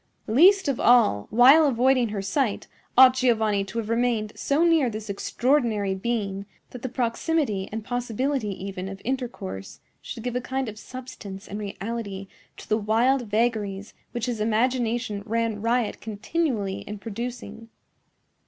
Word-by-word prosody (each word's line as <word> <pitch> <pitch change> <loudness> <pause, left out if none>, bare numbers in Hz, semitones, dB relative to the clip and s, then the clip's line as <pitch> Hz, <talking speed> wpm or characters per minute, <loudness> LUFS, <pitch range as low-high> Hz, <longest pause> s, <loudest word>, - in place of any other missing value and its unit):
Least 360 - +5
of 275 -4 0
all, 225 - +4
while 270 +7 +7
avoiding 255 -1 +3
her 205 -2 -4
sight, 215 +2 -1 0.3
ought 255 0 +9
Giovanni 220 -6 +2
to 210 - -8
have 225 -2 -2
remained 230 -2 0
so 285 +4 +1
near 325 -7 +4
this 215 -1 -5
extraordinary 225 -2 0
being 200 -1 -3 0.2
that 250 - -9
the 260 - -4
proximity 240 - -1
and 220 0 -4
possibility 245 +2 -1
even 190 -1 -5
of 195 0 -8
intercourse 240 - -5 0.2
should 225 - -8
give 245 -1 -3
a 250 - 0
kind 260 +1 -3
of 215 -1 -7
substance 220 -7 -9
and 205 - -6
reality 200 -1 -5 0.3
to - - -11
the 215 - +1
wild 235 +4 +2
vagaries 210 -2 -1 0.2
which 240 -1 -3
his 240 -4 -3
imagination 230 -1 0
ran 225 -1 -1
riot 230 0 0
continually 220 - -2
in 210 - -7
producing. 230 +1 -7
230 Hz, 145 wpm, -25 LUFS, 205-250 Hz, 0.3 s, ought